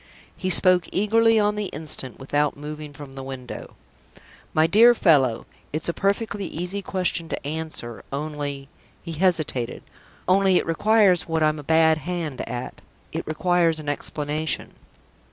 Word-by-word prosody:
He 185 - -3
spoke 180 -2 +4
eagerly 225 +3 +3
on 210 0 +2
the 210 0 -2
instant, 145 -6 -2
without 145 +2 0
moving 150 0 -7
from 145 -1 -11
the 135 - -7
window. 130 -2 -8 0.8
"My 155 - +3
dear 230 +7 +6
fellow, 135 - +3 0.3
it's 155 +1 -2
a 170 - 0
perfectly 200 0 -1
easy 180 +5 -4
question 180 -3 -1
to - - -4
answer. 155 -7 -4
Only" 145 -1 -4 0.4
he 170 - -6
hesitated 155 -8 -1 0.4
"only 190 0 +4
it - - 0
requires 195 +1 +3
what 160 -1 0
I'm 155 0 +2
a - - -8
bad 160 +1 +4
hand 170 -5 -4
at: 125 +1 -6 0.3
it - - -4
requires 165 0 +2
an 150 -1 -5
explanation." 150 +2 -2
160 Hz, 145 wpm, -24 LUFS, 145-185 Hz, 0.8 s, dear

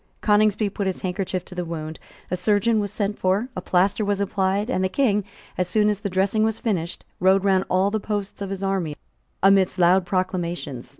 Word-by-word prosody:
Coningsby 210 0 +3
put 200 0 -2
his 190 - -3
handkerchief 185 -1 -3
to - - -11
the 180 -1 -3
wound: 160 -2 -6 0.3
a - - +2
surgeon 210 +4 +2
was 205 -2 -2
sent 205 0 -2
for: 195 +7 +1
a 185 - -3
plaster 190 +4 +1
was 205 -1 0
applied; 200 +1 0
and 215 -7 0
the 185 - +1
King, 210 -4 +1 0.4
as 180 - +1
soon 210 +3 +2
as 205 -2 -1
the 205 - -2
dressing 195 +3 +1
was 220 0 0
finished, 185 -8 -3
rode 190 +1 +4
round 190 -1 +2
all 190 +2 +2
the 220 - 0
posts 205 -1 -4
of 200 - -3
his 195 0 -5
army 190 -6 -1 0.5
amidst 195 -1 +4
loud 180 +1 +4
acclamations. 175 -8 -3
195 Hz, 200 wpm, -23 LUFS, 185-205 Hz, 0.5 s, rode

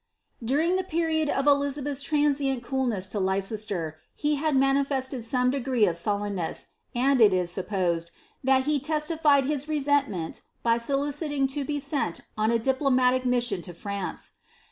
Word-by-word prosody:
During 310 +10 +2
the 375 - -1
period 320 -3 0
of 275 - 0
Elizabeth's 285 -1 +1
transient 280 -3 +1
coolness 240 -8 -1
to 205 - -2
Leiceat^, 195 -3 -1 0.3
h 295 -1 +2
had 310 -1 +1
manifested 270 -1 +1
some 250 +2 +1
degree 255 -4 +1
of 175 -4 0
euilenness, 200 -1 -2 0.3
and 260 +1 +3
it 210 -2 +7
is 180 -2 0
supposed, 175 -3 -1 0.3
that 265 +1 +3
h 300 -2 +1
leslilied 300 -1 +2
his 290 0 -1
resentment 280 - 0 0.2
by 230 0 +3
soliciting 280 +2 -1
to 290 -1 -2
be 290 +1 -2
sent 270 - -2
on 215 0 +1
a 235 - +3
diplomatic 255 0 +2
mbmi 240 -7 0
lo 175 - -8
France. 200 +1 -4
265 Hz, 145 wpm, -26 LUFS, 210-285 Hz, 0.3 s, it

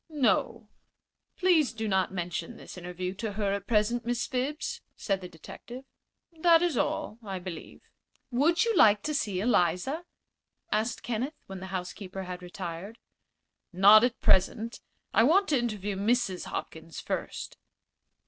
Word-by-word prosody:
"No. 235 -6 +1 0.7
Please 345 -8 +3
do 220 -1 -3
not 190 -2 +1
mention 180 +5 -4
this - - -11
interview 180 +1 -5
to 210 +1 -4
her 200 -1 0
at 200 0 -4
present, 235 +2 +2
Miss 240 0 -1
Phibbs," 270 +4 -2
said 195 -2 -1
the 180 - -7
detective. 240 - -10 0.5
"That 335 0 +6
is 345 -5 +1
all, 225 -1 -1
I 195 -3 -4
believe." 180 -2 -8 0.5
"Would 325 - +3
you 460 -2 +1
like 210 - +6
to 305 - -1
see 205 -10 -1
Eliza?" 210 - +1 0.7
asked 220 +3 0
Kenneth, 245 +6 -2
when 195 -1 -8
the 190 - -7
housekeeper 185 +1 -5
had 180 -1 -6
retired. 180 +3 -7 0.7
"Not 205 +4 +8
at 245 0 +1
present. 220 +5 +2 0.3
I - - +5
want 350 - +4
to 285 -4 +3
interview 210 -4 -2
Mrs. 205 -2 0
Hopkins 160 0 -6
first." - - -4
215 Hz, 145 wpm, -29 LUFS, 185-245 Hz, 0.7 s, Not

